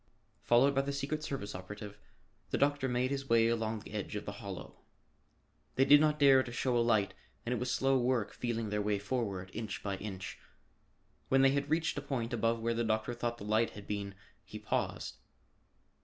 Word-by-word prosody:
Followed 130 +4 +4
by 135 - +3
the 140 +1 -3
secret 140 +2 -3
service 130 -9 -4
operative, 105 +3 -8 0.5
the - - 0
doctor 145 -1 +2
made 125 +1 0
his 135 -1 -3
way 115 -1 +5
along 115 -1 0
the - - -12
edge 105 0 -4
of 105 - -4
the - - -4
hollow. 95 -3 -8 1.0
They 135 - +4
did 145 +1 +8
not 150 -1 +3
dare 135 -2 +7
to 125 - -6
show 125 +1 0
a 120 - +4
light 110 -4 +2 0.3
and 120 - 0
it - - -1
was 125 - -2
slow 135 +1 +2
work 120 -4 0
feeling 115 -3 -2
their 105 0 0
way 105 0 +1
forward, 100 -4 -3
inch 110 -3 -5
by 100 -1 -2
inch. 95 -2 -6 0.9
When 135 0 +5
they 135 - +6
had 140 +1 -1
reached 165 +1 +1
a - - -6
point 120 -3 -3
above 115 0 +1
where 115 +1 0
the 115 +1 0
doctor 110 +1 0
thought 120 0 -2
the 100 - -9
light 110 +2 +2
had 100 - -9
been 100 -1 -4 0.3
he - - -9
paused. - - -2
115 Hz, 200 wpm, -33 LUFS, 105-135 Hz, 1.0 s, did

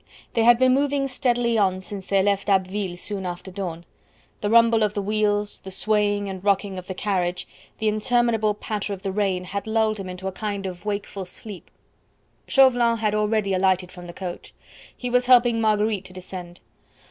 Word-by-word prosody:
They 230 - +2
had 240 0 +7
been 255 +1 +4
moving 280 0 +1
steadily 240 -3 +1
on 190 -2 +2
since 195 0 -7
they 195 -1 +3
left 200 0 0
Abbeville 190 -1 0
soon 195 +2 -4
after 180 +1 -6
dawn; 175 -3 -5 0.5
the 205 - -1
rumble 230 0 +5
of 210 0 +1
the 205 - 0
wheels, 210 0 0
the 190 - -10
swaying 205 +1 +1
and 190 -1 -6
rocking 200 -1 +1
of 180 - -12
the 185 - -5
carriage, 180 -3 -1 0.3
the 220 - -1
interminable 220 0 +1
patter 210 -1 -4
of 195 0 -8
the 195 - -2
rain 190 -2 0
had 200 +3 -5
lulled 220 -1 +1
him 190 -1 -6
into 180 +1 -6
a - - -2
kind 200 0 -4
of 180 0 -7
wakeful 200 -2 -4
sleep. 195 0 -9 0.8
Chauvelin 245 -4 +4
had 215 -2 0
already 210 -1 +1
alighted 185 -1 +1
from 180 -1 -10
the - - -7
coach. 180 -1 -7 0.4
He 245 -1 -4
was 250 0 +2
helping 240 -2 +5
Marguerite 210 -2 +1
to 185 - -9
descend. 180 -1 -9
205 Hz, 185 wpm, -24 LUFS, 190-220 Hz, 0.8 s, had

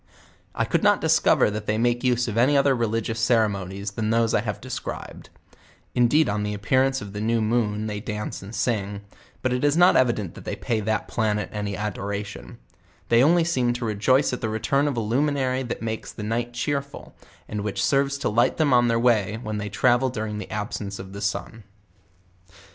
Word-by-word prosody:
I - - +1
could - - 0
not - - +4
discover - - +3
that 105 0 -5
they 110 - +1
make 120 +2 +1
use 125 -1 +2
of 110 - -3
any 130 +5 +4
other 140 -1 +4
reli 115 -1 0
gious 115 +1 -3
ceramonies 100 -4 0
than 110 +1 -2
those 115 0 +2
I - - +3
have - - -4
deocribed; - - -7 0.7
indeed 125 +5 +3
on 105 +1 -1
the 105 0 -2
appearance 130 +6 +1
of 100 -1 -9
the 105 - -4
new 115 +1 +1
rnoon 110 -1 0
they 105 -1 -3
dance 105 0 -5
and 100 +4 -9
sing; 100 -4 -1 0.4
but 130 -1 +1
it 125 - -1
is 145 +2 +3
not 180 +1 +6
evident 115 -8 +1
that - - -11
they - - -4
pay 115 -2 -1
that 110 +1 -1
planet 105 -2 -1
any 105 -2 -3
adoration; 100 - -5 0.5
they 115 0 +5
on 155 +6 +5
ly 175 - +3
seem 130 -8 +1
to 120 0 -4
rejoice 120 +6 +2
at 125 - -4
the 110 - -1
return 115 +7 +1
of 140 -4 -2
a - - +1
luminary 130 +3 0
that 120 -2 -5
makes 110 -1 -4
the 105 - -8
night 115 +3 -2
cheerful, 140 +3 -4 0.3
and 105 -1 -4
which 105 -1 -1
serves 140 0 +1
to 140 - -2
light 115 +3 +2
them 150 -4 +3
on 120 -1 +5
their 115 0 +2
way 110 -3 +2
when 110 -1 -3
they 105 0 -4
travel 120 +5 +2
during 110 -3 -4
the 100 - -7
absence 105 -1 -4
of 95 0 -9
the 100 - -7
sun. 105 +2 -3
115 Hz, 205 wpm, -24 LUFS, 105-125 Hz, 0.7 s, not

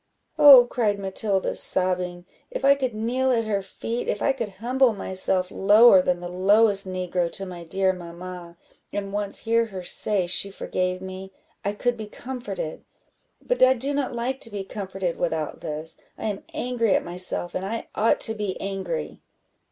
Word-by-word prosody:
"Oh," 275 -5 +10
cried 220 -4 0
Matilda, 195 0 -1
sobbing, 180 -1 +2 0.2
"if - - -3
I 280 - +7
could 260 -5 -3
kneel 250 +4 0
at 230 -2 +2
her 210 -2 -1
feet, 225 +5 -5
if 205 - -1
I 275 - +2
could 235 -5 -4
humble 245 +4 +2
myself 190 -2 -2
lower 205 0 +6
than 180 -1 0
the 175 - -5
lowest 195 +2 +3
negro 180 -2 -2
to 195 - -4
my 175 -2 -8
dear 190 +3 0
mamma, 175 0 -9 0.3
and 200 -1 -4
once 205 -1 -2
hear 230 +1 +2
her 190 -4 -7
say 195 +1 0
she 180 +3 +1
forgave 185 -1 -3
me, 190 0 -8 0.3
I 200 - -1
could 245 +3 -1
be 215 -1 -6
comforted; 210 -9 -6 0.6
but - - -1
I 255 0 +6
do 270 +4 -2
not 280 -2 -1
like 255 +3 -2
to 230 - -2
be 205 -2 -5
comforted 190 -3 -4
without 160 -3 -2
this; 155 +1 -5 0.2
I - - -9
am 205 -2 -3
angry 245 -8 0
at - - 0
myself, 175 0 -3
and 185 - -3
I 225 +4 -4
ought 220 +2 +2
to 220 - +2
be 210 -3 -4
angry." 190 - -4
195 Hz, 175 wpm, -24 LUFS, 185-230 Hz, 0.6 s, Oh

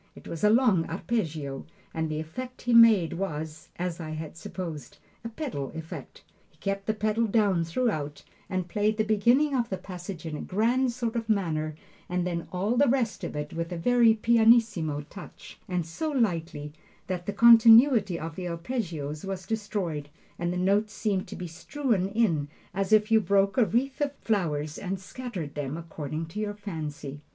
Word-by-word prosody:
It - - -13
was 165 +2 -6
a 210 - +6
long 215 -8 +3
arpeggio, 160 - -3 0.3
and 160 -1 -2
the 155 0 -2
effect 250 +12 -7
he 245 - +1
made 225 -7 +7
was, 160 -4 -5
as 175 -1 -3
I 160 -2 -5
had 155 0 -6
supposed, 165 -6 -7 0.3
a 230 - -4
pedal 225 - -4
effect. 160 0 -8 0.3
He - - -30
kept 195 0 -3
the 215 - +1
pedal 215 +2 +1
down 200 -5 +2
throughout, 165 - -2 0.3
and 185 -2 -2
played 210 +3 0
the 215 - +2
beginning 240 +7 +3
of 240 -2 0
the 190 - -2
passage 180 -2 -8
in 160 -2 -4
a - - -5
grand 240 +6 +1
sort 235 -1 -3
of 230 -1 -3
manner, 155 -7 0 0.3
and 180 0 0
then 170 -2 -3
all 200 +7 0
the 285 +2 +5
rest 240 -3 0
of - - -4
it 150 0 -4
with 165 +1 -3
a 175 - -3
very 235 +4 +4
pianissimo 220 -9 +3
touch, 180 +6 -12
and 180 -3 -1
so 170 - -3
lightly, 165 - -1 0.3
that 180 -2 -4
the - - 0
continuity 230 -2 +7
of 160 0 -6
the 180 0 -4
arpeggios 165 - -4
was 190 -2 -5
destroyed, 190 -8 -3 0.3
and 175 0 -1
the 180 - -2
notes 200 +4 +1
seemed 200 -4 -1
to - - -7
be 180 - -6
just 165 0 -10
strewn 235 - 0
in, 195 -9 +1 0.3
as 195 +2 -2
if 215 +1 +4
you 220 -1 +6
broke 195 +1 +2
a 245 - +4
wreath 260 - -1
of 285 -1 0
flowers 155 - -1
and 195 0 -3
scattered 190 - -6
them 145 +1 -4
according 160 -1 -5
to 165 +6 -7
your 205 -1 -2
fancy. 150 -8 -6
190 Hz, 185 wpm, -27 LUFS, 165-225 Hz, 0.3 s, made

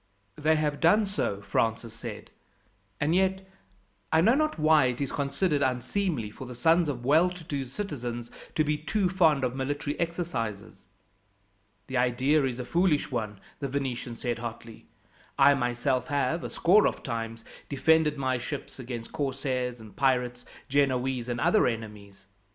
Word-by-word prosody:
"They 155 +1 +2
have 150 -2 0
done 205 +6 +4
so," 150 - -2
Francis 115 +2 -1
said; 115 - -8 0.7
"and 150 +2 +1
yet, 190 +1 +1 0.6
I 160 - +4
know 220 +8 +5
not 310 -2 +1
why, 155 -2 +5
it 125 -1 -1
is 140 -2 -2
considered 145 +2 0
unseemly 130 - -1
for 130 +4 -9
the 125 - -8
sons 165 +5 +3
of 120 -4 -4
well 160 +6 +5
to 180 -1 -9
do 145 -5 -3
citizens 120 - -5 0.2
to 155 - +3
be 150 0 0
too 185 +4 0
fond 160 -7 +3
of 125 0 -1
military 145 +2 -3
exercises." 155 - -3 1.0
"The 130 - -3
idea 130 +5 +2
is 125 -2 -2
a 125 - -4
foolish 170 -1 +1
one," 110 -5 -3 0.2
the 140 - -2
Venetian 130 -3 -3
said 120 -1 -3
hotly. 115 -1 -8 0.5
"I 145 - +7
myself 125 +1 0
have, 145 +2 0
a - - -4
score 200 +5 +4
of - - -4
times, 115 -2 -4 0.2
defended 150 +1 +3
my 130 -2 0
ships 135 +2 -6
against 120 -2 -6
corsairs 130 -3 -2
and 110 -2 -13
pirates, 125 -2 +1 0.2
Genoese, 130 -3 +1
and 120 -1 -2
other - - +4
enemies. 105 -4 -6
135 Hz, 155 wpm, -28 LUFS, 120-155 Hz, 1.0 s, I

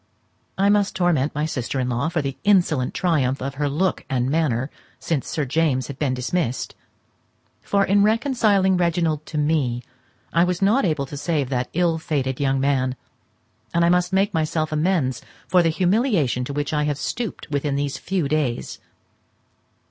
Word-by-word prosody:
I 195 +1 +3
must 205 -1 +2
torment 160 -7 +1
my 150 +1 0
sister 135 -3 -3
in 125 - 0
law 125 +6 0
for 160 -3 -1
the 135 -1 -3
insolent 175 -10 +2
triumph 140 -7 +1
of 135 +1 -4
her 145 - +1
look 175 +6 0
and 130 0 0
manner 140 -5 0 0.3
since 155 -6 -2
Sir 150 - -2
James 135 -2 +1
has 140 - -5
been 135 -4 0
dismissed; 130 0 -2 0.9
for, 200 -1 +1
in 200 +2 +3
reconciling 215 -4 +3
Reginald 165 -3 0
to 155 - -5
me, 145 -5 0 0.5
I 170 - +4
was 180 -1 0
not 205 +5 +3
able 155 -5 0
to 140 - -8
save 145 -3 -1
that 125 -2 -1
ill 170 -1 +1
fated 135 -5 -2
young 135 -1 +1
man; 130 -2 +1 0.8
and 170 0 +4
I - - +4
must 180 +1 +2
make 195 +2 +2
myself 155 -1 -1
amends 155 -5 0 0.3
for 180 - +4
the 165 - +2
humiliation 180 - +1
to 140 - -5
which 145 +1 -2
I 150 0 +1
have 145 -2 -1
stooped 215 +2 -4
within 145 0 -1
these 140 -1 -2
few 185 -6 -1
days. 140 -5 -2
155 Hz, 170 wpm, -22 LUFS, 135-180 Hz, 0.9 s, I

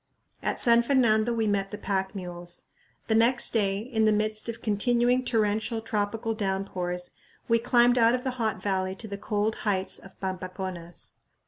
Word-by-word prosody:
At - - -2
San 235 -1 +5
Fernando 235 -3 +3
we 225 -1 0
met 200 -2 0
the 210 - -6
pack 190 -1 -2
mules. 175 -2 -6 0.4
The 220 - 0
next 235 +2 +4
day, 200 -4 +1
in 220 0 0
the 215 - +5
midst 215 +1 -1
of 230 0 -5
continuing 240 +4 +2
torrential 220 -1 0
tropical 225 0 -2
downpours, 190 -3 -3 0.4
we 230 0 +3
climbed 245 +1 +4
out 230 +1 +5
of 250 - -4
the 260 - -1
hot 220 -3 0
valley 190 -1 -1
to 220 - -6
the 200 -1 -6
cold 210 +1 -1
heights 195 -3 -1
of 195 - -15
Pampaconas. 185 -2 -6
215 Hz, 165 wpm, -27 LUFS, 190-230 Hz, 0.4 s, San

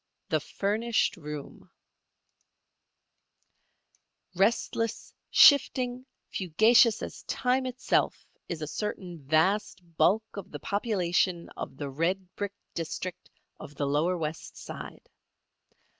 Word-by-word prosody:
THE - - +2
FURNISHED 220 +3 0
ROOM 150 -3 -8 2.7
Restless, 225 +3 0 0.2
shifting, 255 -3 +5 0.2
fugacious 220 +6 +4
as - - -7
time 255 +1 0
itself 250 0 0 0.2
is 160 -3 -4
a - - -3
certain 180 -2 -4
vast 180 +9 +1 0.2
bulk 195 +8 +4
of 200 -2 -7
the 145 - -7
population 185 -4 0
of - - -7
the 140 -2 -4
red 180 +6 -1
brick 205 -1 -4 0.2
district 170 +2 -5 0.3
of 145 - -10
the 145 - -1
lower 155 +6 +1
West 160 -1 -5
Side. - - -9
185 Hz, 100 wpm, -28 LUFS, 160-220 Hz, 2.7 s, shifting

